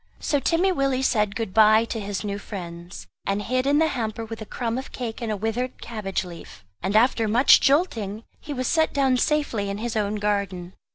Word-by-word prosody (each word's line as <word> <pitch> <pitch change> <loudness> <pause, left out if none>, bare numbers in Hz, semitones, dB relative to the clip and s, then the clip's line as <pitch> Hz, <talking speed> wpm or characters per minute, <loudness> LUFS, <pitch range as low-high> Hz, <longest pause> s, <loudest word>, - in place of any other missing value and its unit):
So 290 - 0
Timmy 345 +7 +2
Willie 275 -5 0
said 210 -5 +1
good 220 -3 -3
bye 220 +1 +6
to 230 - -4
his 200 -1 -4
new 200 -1 -3
friends, 175 -3 -8 0.2
and 195 +1 0
hid 255 +5 -1
in 285 +1 +4
the 320 +1 +3
hamper 225 -3 -3
with 225 0 -8
a 215 - -7
crumb 235 0 -2
of 265 - -9
cake 240 -2 -5
and 230 -2 -2
a 210 - -1
withered 225 +5 -3
cabbage 210 -5 -3
leaf; 165 - -11 0.2
and 190 +3 -2
after 230 0 +3
much 235 +6 +6
jolting, 230 - +1 0.2
he 295 - -9
was 255 -2 -2
set 320 +2 +2
down 265 -2 +3
safely 250 -8 0
in 200 - -3
his 230 +1 -4
own 210 -1 0
garden. 200 -4 -2
225 Hz, 210 wpm, -24 LUFS, 205-255 Hz, 0.2 s, bye